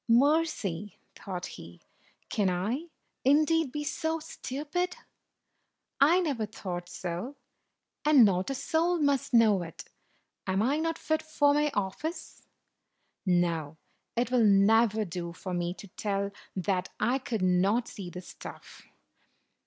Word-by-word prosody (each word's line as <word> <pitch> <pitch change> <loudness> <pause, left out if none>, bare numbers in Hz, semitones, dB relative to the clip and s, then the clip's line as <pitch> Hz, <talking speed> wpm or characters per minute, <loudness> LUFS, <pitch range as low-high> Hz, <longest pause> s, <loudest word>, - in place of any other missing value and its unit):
"'Mercy!" 235 - +2 0.2
thought 180 -3 -5
he. 85 +1 -10 0.5
"Can 200 -3 +1
I, 215 - -2 0.4
indeed, 305 +2 +3
be 295 +2 -3
so 320 +2 -1
stupid? 310 +5 -3 1.0
I 320 +6 +6
never 270 -11 -1
thought 175 -4 -6
so, 180 +9 -5 0.7
and 295 -6 +7
not 190 0 +1
a 275 - -1
soul 335 +6 +1
must 285 -4 +1
know 220 -5 +5
it. 165 -1 -8 0.6
Am 190 +2 +1
I 275 +5 +2
not 330 0 -1
fit 315 -1 0
for 290 -2 +2
my 295 +1 +2
office? 205 - -4 0.8
No, 170 -4 +1 0.4
it 240 +1 0
will 250 -2 +4
never 215 +2 +4
do 170 -1 -5
for 185 +1 -6
me 175 0 -1
to 200 - -11
tell 200 0 -2 0.2
that 185 0 -1
I 245 +5 +2
could 225 -6 -3
not 190 +6 +2
see 195 -4 -7
the 180 +1 -7
stuff." - - -11
220 Hz, 130 wpm, -29 LUFS, 185-290 Hz, 1.0 s, and